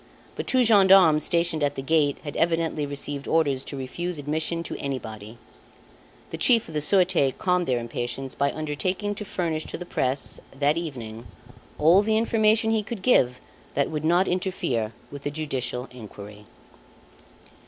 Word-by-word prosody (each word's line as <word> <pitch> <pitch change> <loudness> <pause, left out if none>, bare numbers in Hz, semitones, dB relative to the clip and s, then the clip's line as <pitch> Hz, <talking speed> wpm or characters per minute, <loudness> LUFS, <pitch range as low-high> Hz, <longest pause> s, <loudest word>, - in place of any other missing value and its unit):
But - - -5
two 255 -1 +3
gendarmes 190 -8 +6
stationed 170 -2 +1
at 145 0 0
the 135 - -5
gate 145 -1 +2
had 145 -2 -6
evidently 165 -3 0
received 140 0 -4
orders 145 -5 +1
to 140 - -6
refuse 170 +7 -4
admission 155 +3 -2
to - - -4
anybody. 110 -5 -6 0.9
The - - -5
Chief 235 -3 +4
of 160 - -10
the 150 - -1
Surete 180 -5 +2
calmed 180 -1 +1
their 125 - +1
impatience 120 +3 -4
by 140 0 0
undertaking 170 +7 -2
to 205 - -6
furnish 165 -5 -3
to - - -6
the 180 - -7
press, 135 -4 -2 0.2
that 145 +1 +3
evening, 120 -9 -6 0.5
all 170 +6 +5
the 220 +1 +1
information 220 0 +3
he 220 -1 +2
could 210 -2 -7
give 125 - +3 0.4
that 140 +2 +1
would 155 -1 -3
not 175 +4 +3
interfere 175 - -1 0.2
with 145 - -8
the 145 - -3
judicial 135 -4 -3
inquiry. 105 -3 -11
155 Hz, 160 wpm, -25 LUFS, 135-180 Hz, 0.9 s, gendarmes